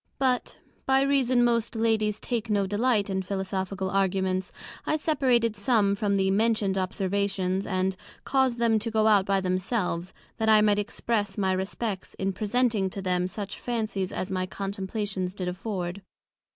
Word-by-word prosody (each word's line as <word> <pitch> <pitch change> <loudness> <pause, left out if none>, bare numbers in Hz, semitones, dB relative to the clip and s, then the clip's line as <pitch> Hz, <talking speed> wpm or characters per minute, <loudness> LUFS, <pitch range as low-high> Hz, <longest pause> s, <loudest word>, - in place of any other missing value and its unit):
But, 255 -3 0 0.3
by 265 0 +4
reason 260 -3 +3
most 235 -1 +1
Ladies 220 -2 +1
take 235 -2 -3
no 200 -2 +2
delight 210 +1 +1
in 190 -1 -1
Philosophical 190 0 -3
Arguments, 190 -1 0 0.3
I - - 0
separated 255 -8 +2
some 205 -1 +2
from 200 0 0
the 190 -1 +2
mentioned 210 -1 +2
Observations, 190 0 -1
and 185 0 0 0.3
caused 265 -3 +2
them 230 -2 +3
to 225 +2 -2
go 220 -1 +2
out 205 -3 +4
by 195 -1 +2
themselves, 185 -1 -1 0.3
that 220 -1 +1
I 215 -1 +7
might 210 -1 +3
express 205 -1 -2
my 190 -2 +1
Respects, 190 +2 -3
in 195 0 -1
presenting 215 -1 +1
to 195 - -6
Them 180 -1 +1
such 200 +2 -6
Fancies 215 -6 -2
as 185 - -4
my 185 -1 -1
Contemplations 195 -1 -3
did 185 -3 -4
afford. 185 0 -4
200 Hz, 155 wpm, -27 LUFS, 190-225 Hz, 0.3 s, I